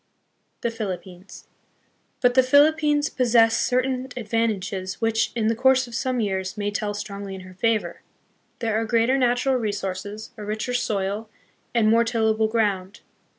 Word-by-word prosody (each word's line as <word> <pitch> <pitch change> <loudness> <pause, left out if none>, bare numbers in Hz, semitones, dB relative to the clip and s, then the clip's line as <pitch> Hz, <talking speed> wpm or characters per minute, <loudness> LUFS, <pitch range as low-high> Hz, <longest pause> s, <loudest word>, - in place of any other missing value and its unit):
The 235 - -1
Philippines. 190 -4 -7 0.7
But 245 -1 +4
the 260 - +6
Philippines 295 +2 +4
possess 230 -4 +3
certain 255 0 0
advantages 205 -5 -2
which, 225 -1 +1
in 225 -2 0
the 225 +1 +2
course 260 +2 +4
of 240 - -13
some 255 +1 -1
years, 190 -2 -2
may 205 0 -1
tell 205 0 -2
strongly 200 -1 -6
in 190 - -9
her 185 0 -12
favor. 225 +3 -1 0.6
There 225 -1 0
are - - -2
greater 230 +3 +2
natural 250 +1 +2
resources, 205 -1 -4
a 210 - -7
richer 215 +4 -3
soil, 210 -2 -2 0.5
and 225 -2 +4
more 230 +2 +5
tillable 220 -1 +1
ground. 205 -4 -1
225 Hz, 150 wpm, -24 LUFS, 205-245 Hz, 0.7 s, the